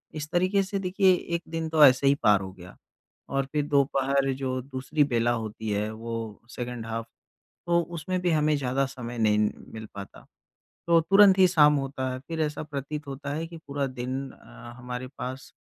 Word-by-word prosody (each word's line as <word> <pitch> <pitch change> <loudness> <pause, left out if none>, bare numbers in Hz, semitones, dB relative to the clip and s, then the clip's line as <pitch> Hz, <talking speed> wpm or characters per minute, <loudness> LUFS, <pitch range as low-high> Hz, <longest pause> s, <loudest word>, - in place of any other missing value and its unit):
इस 155 0 -5
तरीके 185 +3 +2
से 195 +1 -3
देखिए 190 0 +3 0.2
एक 170 - -2
दिन 160 0 -3
तो 155 -1 +5
ऐसे 130 +1 +5
ही 140 - +5
पार 105 -2 +5
हो 95 0 -6
गया 90 -1 -13 0.5
और 135 0 0
फिर 150 -1 0
दोपहर 140 -1 +2
जो 130 -1 -3
दूसरी 135 +3 -1
बेला 120 -4 +1
होती 110 -1 -4
है 105 +1 -1
वो 115 -1 -6
सेकंड 125 -2 -5
हाफ 115 0 -4 0.6
तो 170 0 +3
उसमें 170 +2 -4
भी 180 - +2
हमें 155 -1 +2
ज़्यादा 135 0 0
समय 120 -3 -7
नहीं 105 -2 +3 0.4
मिल 110 0 -7
पाता। 100 0 -10 0.6
तो 170 -1 +5
तुरंत 195 +3 +6
ही 190 - +7
शाम 150 -4 +5
होता 135 -1 -3
है। 130 - -4
फिर 165 -1 -3
ऐसा 150 -1 -2
प्रतीत 150 0 -5
होता 140 +1 -6
है 160 +2 -3
कि 165 0 -10
पूरा 140 0 -2
दिन 130 +1 -4
अ, 120 -1 -13
हमारे 125 0 -6
पास 130 +1 -6
135 Hz, 190 wpm, -27 LUFS, 120-155 Hz, 0.6 s, ही